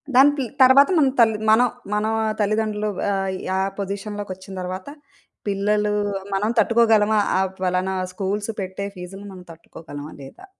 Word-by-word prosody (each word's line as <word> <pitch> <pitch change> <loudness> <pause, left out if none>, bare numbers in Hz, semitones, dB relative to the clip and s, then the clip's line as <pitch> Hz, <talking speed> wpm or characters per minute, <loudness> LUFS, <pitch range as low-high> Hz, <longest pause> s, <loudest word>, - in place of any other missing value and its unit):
దాని 275 +3 +7
ప్లి 270 - -2 0.2
తర్వాత 275 +2 +7
మనం 285 -4 +4
తల్లి 225 -2 +5
మనం 240 +3 +5 0.3
మన 210 +1 0 0.3
తల్లిదండ్రులు 215 0 0 0.2
ఆహ్, 195 -1 -1 0.2
యా 190 - 0 0.2
పొజిషన్‌లోకొచ్చిన 200 -1 -6
తర్వాత 185 +1 -6 0.6
పిల్లలు 210 +1 +1 0.4
మనం 200 +3 0
తట్టుకోగలమా 220 -1 +4 0.2
ఆ - - +2 0.2
ఫలానా 185 +1 0 0.2
స్కూల్స్ 200 +3 -3
పెట్టే 190 +1 -4
ఫీజ్‌లని 190 +3 -9
మనం 185 -1 -11
తట్టుకోగలమా 160 -2 -10
లేదా, 135 - -12
200 Hz, 130 wpm, -22 LUFS, 190-215 Hz, 0.6 s, దాని